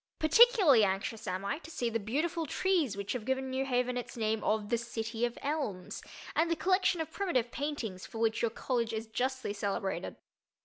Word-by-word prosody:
Particularly 360 Hz, -, +6 dB
anxious 200 Hz, +3 st, -1 dB
am 185 Hz, +2 st, -2 dB
I 280 Hz, +9 st, -1 dB
to 315 Hz, -, -12 dB
see 250 Hz, -7 st, -2 dB
the 230 Hz, 0 st, 0 dB
beautiful 310 Hz, -, -1 dB
trees 325 Hz, -, +1 dB
which 200 Hz, 0 st, -3 dB
have 250 Hz, -4 st, -4 dB
given 265 Hz, +2 st, -1 dB
New 265 Hz, +1 st, 0 dB
Haven 250 Hz, -1 st, 0 dB
its 245 Hz, -, -6 dB
name 220 Hz, -1 st, 0 dB
of 215 Hz, -1 st, 0 dB
"the 235 Hz, -, +2 dB
City 230 Hz, 0 st, -2 dB
of 240 Hz, -, -4 dB
Elms," 275 Hz, -12 st, -3 dB, 0.3 s
and 330 Hz, +1 st, +3 dB
the 335 Hz, -, +2 dB
collection 370 Hz, -1 st, +2 dB
of 320 Hz, -, -5 dB
primitive 260 Hz, -, 0 dB
paintings 255 Hz, -11 st, -4 dB
for -, -, -9 dB
which 225 Hz, 0 st, +1 dB
your 230 Hz, -, +2 dB
college 230 Hz, 0 st, -1 dB
is 220 Hz, 0 st, -3 dB
justly 255 Hz, 0 st, -2 dB
celebrated. 195 Hz, -3 st, -2 dB
240 Hz, 190 wpm, -31 LUFS, 220-295 Hz, 0.3 s, Particularly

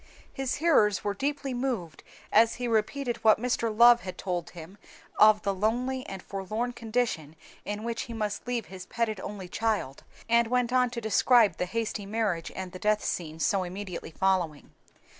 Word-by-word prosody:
His 270 Hz, -1 st, -2 dB
hearers 275 Hz, -, +3 dB
were 205 Hz, -, -1 dB
deeply 275 Hz, +4 st, -2 dB
moved 245 Hz, -11 st, -3 dB, 0.3 s
as 225 Hz, +1 st, +5 dB
he 245 Hz, 0 st, -3 dB
repeated 235 Hz, +3 st, 0 dB
what 215 Hz, -1 st, +4 dB
Mr. 235 Hz, -1 st, 0 dB
Love 235 Hz, +2 st, +7 dB
had 185 Hz, -, -7 dB
told 175 Hz, -2 st, -3 dB
him 175 Hz, +4 st, -11 dB, 0.4 s
of 215 Hz, 0 st, +6 dB
the 200 Hz, -, 0 dB
lonely 245 Hz, +6 st, -1 dB
and 190 Hz, -1 st, -7 dB
forlorn 215 Hz, +5 st, -3 dB
condition 225 Hz, -10 st, -2 dB, 0.3 s
in 205 Hz, +1 st, -4 dB
which 230 Hz, 0 st, -3 dB
he -, -, -5 dB
must 215 Hz, 0 st, -3 dB
leave 240 Hz, -4 st, -2 dB
his 185 Hz, -1 st, -10 dB
petted 225 Hz, -3 st, -2 dB
only 195 Hz, -1 st, -7 dB
child, 210 Hz, -9 st, -2 dB, 0.2 s
and 235 Hz, 0 st, +4 dB
went 250 Hz, 0 st, 0 dB
on 250 Hz, -1 st, +3 dB
to 235 Hz, -1 st, -5 dB
describe 220 Hz, -2 st, +4 dB
the 180 Hz, -, -2 dB
hasty 215 Hz, -1 st, -3 dB
marriage 200 Hz, -6 st, -1 dB
and 190 Hz, -1 st, -5 dB
the 185 Hz, -, -9 dB
death 210 Hz, +1 st, +1 dB
scene, 160 Hz, -2 st, -3 dB
so 190 Hz, +6 st, +2 dB
immediately 185 Hz, 0 st, -6 dB
following. 175 Hz, -3 st, -1 dB
215 Hz, 175 wpm, -28 LUFS, 190-240 Hz, 0.4 s, Love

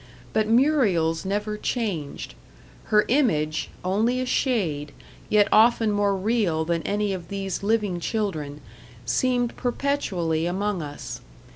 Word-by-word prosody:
But 215 Hz, -1 st, +2 dB
Muriel's 220 Hz, -, +2 dB
never 210 Hz, +2 st, -2 dB
changed. 200 Hz, -, -3 dB, 0.5 s
Her 210 Hz, -1 st, +3 dB
image, 160 Hz, -, +1 dB, 0.2 s
only 220 Hz, +7 st, +1 dB
a 255 Hz, -, -1 dB
shade, 170 Hz, -, 0 dB, 0.4 s
yet 210 Hz, -1 st, +4 dB
often 225 Hz, 0 st, +5 dB
more 205 Hz, -1 st, +2 dB
real 190 Hz, -6 st, 0 dB
than 170 Hz, 0 st, 0 dB
any 205 Hz, +2 st, -1 dB
of 175 Hz, -3 st, -6 dB
these 195 Hz, 0 st, -4 dB
living 205 Hz, -3 st, 0 dB
children, 160 Hz, -8 st, -3 dB, 0.4 s
seemed 245 Hz, -, +1 dB
perpetually 190 Hz, -, -1 dB
among 195 Hz, +1 st, -1 dB
us. 145 Hz, -1 st, -7 dB
205 Hz, 120 wpm, -24 LUFS, 165-230 Hz, 0.5 s, often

